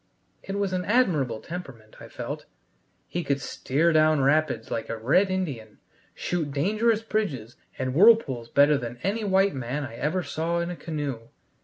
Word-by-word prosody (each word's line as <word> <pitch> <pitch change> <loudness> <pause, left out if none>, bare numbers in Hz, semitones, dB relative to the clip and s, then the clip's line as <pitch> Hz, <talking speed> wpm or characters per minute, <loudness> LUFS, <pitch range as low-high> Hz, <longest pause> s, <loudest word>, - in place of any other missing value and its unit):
It 195 - -6
was 200 -2 -1
an 180 0 -1
admirable 160 - +1
temperament, 135 -11 -9
I - - -10
felt: - - -6 0.6
he 175 - -3
could 140 -2 0
steer 150 +4 0
down 155 -1 +4
rapids 140 -5 +1
like 115 - -3
a 115 - -3
red 145 - +3
Indian, 140 - -4 0.4
shoot 170 -4 -2
dangerous 215 +10 +1
bridges 150 - -2 0.2
and 130 -1 -2
whirlpools 155 - +4
better 145 0 +4
than 120 -1 -6
any 205 +5 -1
white 195 0 +3
man 130 +2 -3
I 125 -5 -7
ever 155 +8 -1
saw 165 +2 -2
in 170 +1 -2
a - - -5
canoe. 145 -9 -5
155 Hz, 165 wpm, -26 LUFS, 130-185 Hz, 0.6 s, down